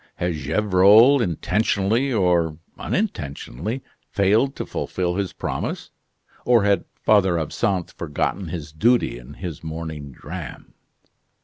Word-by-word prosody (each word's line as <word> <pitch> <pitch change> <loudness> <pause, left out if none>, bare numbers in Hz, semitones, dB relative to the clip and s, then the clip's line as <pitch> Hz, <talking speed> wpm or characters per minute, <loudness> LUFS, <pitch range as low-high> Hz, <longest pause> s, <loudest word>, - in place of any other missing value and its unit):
Had 90 0 -1
Gevrol 105 - +5
intentionally 105 - 0
or 90 -7 +2 0.2
unintentionally 110 - -3 0.3
failed 110 +7 +2
to - - -4
fulfil 90 -1 -2
his 100 -1 -2
promise, - - -4 0.5
or 120 -4 +4
had 100 -3 +2 0.2
Father 95 -5 +4
Absinthe 90 +3 -1
forgotten 85 +4 -3
his 80 -3 -6
duty 115 - +2
in 65 +4 -12
his 85 -5 -7
morning 80 -3 -6
dram? - - -9
90 Hz, 110 wpm, -22 LUFS, 80-110 Hz, 0.5 s, Gevrol